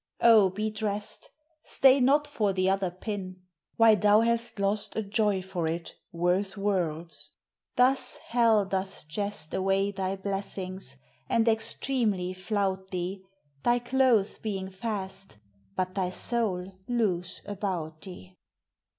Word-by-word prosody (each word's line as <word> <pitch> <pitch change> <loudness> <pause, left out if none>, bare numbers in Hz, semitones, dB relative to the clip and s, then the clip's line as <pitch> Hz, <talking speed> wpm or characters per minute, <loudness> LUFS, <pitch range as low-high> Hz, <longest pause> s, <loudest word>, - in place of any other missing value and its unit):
O, 220 -5 +7
be 215 +3 -3
drest! 210 -1 -4 0.3
Stay 270 0 +5
not 280 +4 +4
for 215 -9 0
th' 185 0 +1
other 195 -1 +1
pin: 185 0 -6 0.3
why 225 -1 +7
thou 210 0 +5
hast 235 0 +1
lost 205 +1 0
A 220 - -1
joy 205 -2 +1
for 180 -3 -3
it 165 +1 -4 0.2
worth 180 +4 0
worlds. 175 -5 -2 0.4
Thus 260 +2 +3
hell 230 -4 +2
doth 190 -4 -4
jest 200 0 -3
Away 195 +1 +1
thy 190 -1 -2
blessings, 190 -6 -4 0.3
and 230 0 +2
extremely 220 -4 +1
flout 190 0 -2
thee, 185 +1 -4 0.4
Thy 240 - +3
clothes 245 -4 +2
being 195 -3 -4
fast, 195 - -4 0.4
but 185 0 -1
thy 190 -2 -1
soul 190 -3 -1
loose 190 -7 -1
about 180 -6 -4
thee. 185 -1 -11
195 Hz, 125 wpm, -28 LUFS, 185-220 Hz, 0.4 s, O